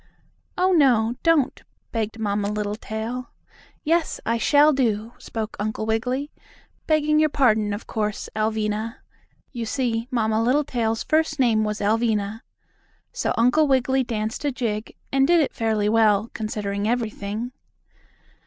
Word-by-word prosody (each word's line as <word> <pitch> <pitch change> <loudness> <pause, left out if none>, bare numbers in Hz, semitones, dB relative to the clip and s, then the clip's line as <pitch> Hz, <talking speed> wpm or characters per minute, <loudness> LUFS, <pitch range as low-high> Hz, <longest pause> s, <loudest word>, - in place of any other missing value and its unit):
"Oh, 370 +1 +3
no, 245 -9 +4
don't," 325 -5 +2 0.3
begged 225 -1 -2
Mamma 205 -2 -1
Littletail. 220 +3 -4 0.5
"Yes, 330 +1 +1
I 230 +1 0
shall 295 +4 +5
to," 230 -4 0
spoke 220 -1 -5
Uncle 215 +1 -2
Wiggily. 250 +6 -1 0.6
"Begging 305 -1 +3
your 310 0 +4
pardon, 220 -7 +2
of 205 +2 -5
course, 210 -2 -3
Alvinah." 215 +1 -1 0.6
You 235 -4 -4
see, 235 -2 -1
Mamma 220 -3 +1
Littletail's 240 -3 0
first 315 -1 +1
name 230 -5 +3
was 210 0 -2
Alvinah. 215 0 0 0.7
So - - -1
Uncle 250 +7 +4
Wiggily 265 0 +2
danced 220 0 -3
a 290 - +1
jig, 225 -4 -3 0.2
and 270 0 +3
did 345 +1 +5
it 300 - +1
fairly 220 -3 0
well, 215 0 +3
considering 210 -2 -3
everything. 225 -1 -2
225 Hz, 130 wpm, -23 LUFS, 215-265 Hz, 0.7 s, shall